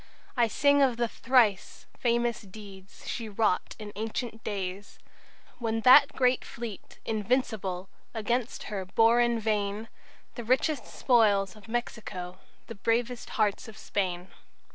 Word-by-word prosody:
I 240 -3 +3
sing 285 +5 +3
of 255 -4 +3
the 235 0 +1
thrice 230 -5 +1
famous 235 -1 0
deeds 195 -2 -13
She 225 -2 -4
wrought 205 -2 0
in 210 -2 -8
ancient 225 +2 -4
days, 195 -1 -5 0.6
When 225 -2 -1
that 270 +4 +7
great 255 -1 +2
fleet 230 -5 -8
'Invincible' 210 -5 -1 0.2
Against 235 +2 -2
her 200 -3 -4
bore 225 +5 +4
in 240 -1 +2
vain 210 0 -1 0.4
The 240 - -6
richest 260 +4 +1
spoils 205 -6 +2
of 210 -3 -15
Mexico, 215 -6 -5 0.3
The 230 - -8
bravest 235 +3 -1
hearts 210 -1 +1
of 220 - -11
Spain." 185 -2 -3
225 Hz, 130 wpm, -28 LUFS, 200-240 Hz, 0.6 s, that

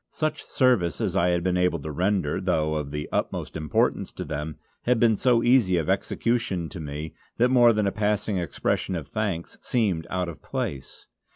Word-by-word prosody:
Such 155 -1 -2
service 100 - +2
as - - -1
I 90 - +3
had 85 -1 +1
been 90 0 +1
able 90 -1 +2
to 80 +1 -6
render, 90 0 0
though 80 -5 +1
of 75 -2 -2
the 75 +1 -4
utmost - - -2
importance 75 -2 0
to - - -5
them, 75 +1 -4 0.3
had 125 -1 +3
been 115 -2 +4
so 120 +2 +3
easy 120 -8 +4
of 85 +2 +1
execution 100 -3 -1
to 95 - -8
me 75 +1 -6 0.2
that 125 +2 +4
more 120 -2 +6
than 105 -2 +1
a 100 - +1
passing 105 -1 0
expression 90 +2 -1
of 80 -5 -5
thanks 100 -7 -3
seemed 100 -9 0
out 90 -1 -1
of 85 - -8
place. 65 -2 -5
90 Hz, 190 wpm, -25 LUFS, 80-110 Hz, 0.3 s, more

